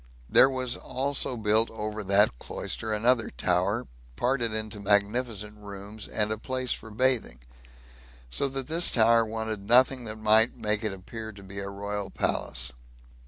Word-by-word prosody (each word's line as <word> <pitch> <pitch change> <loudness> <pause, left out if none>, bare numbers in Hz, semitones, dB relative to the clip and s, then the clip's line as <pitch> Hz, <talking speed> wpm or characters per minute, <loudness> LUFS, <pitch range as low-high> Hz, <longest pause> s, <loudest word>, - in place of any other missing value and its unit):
There 130 - +6
was 130 -2 -1
also 130 -1 -1
built 110 +1 +2
over 110 -1 -5
that 100 - +3
cloister 110 - -4
another 115 +2 +2
tower, 95 +6 0 0.3
parted 120 - +1
into 110 -1 -3
magnificent 105 +1 0
rooms, 100 +1 -8
and 105 0 0
a 110 - -2
place 130 +1 -2
for 110 - -8
bathing; 125 - 0 0.9
so 100 - +1
that 135 -1 -4
this 165 +4 +3
tower 115 0 +4
wanted 110 -2 -5
nothing 125 +1 +4
that 110 0 -5
might 110 +2 +4
make 105 -1 -1
it 110 - 0
appear 110 +4 -8
to 100 0 -13
be 100 +1 -7
a 100 0 -4
royal 100 0 -4
palace. - - -1
110 Hz, 155 wpm, -27 LUFS, 105-120 Hz, 0.9 s, There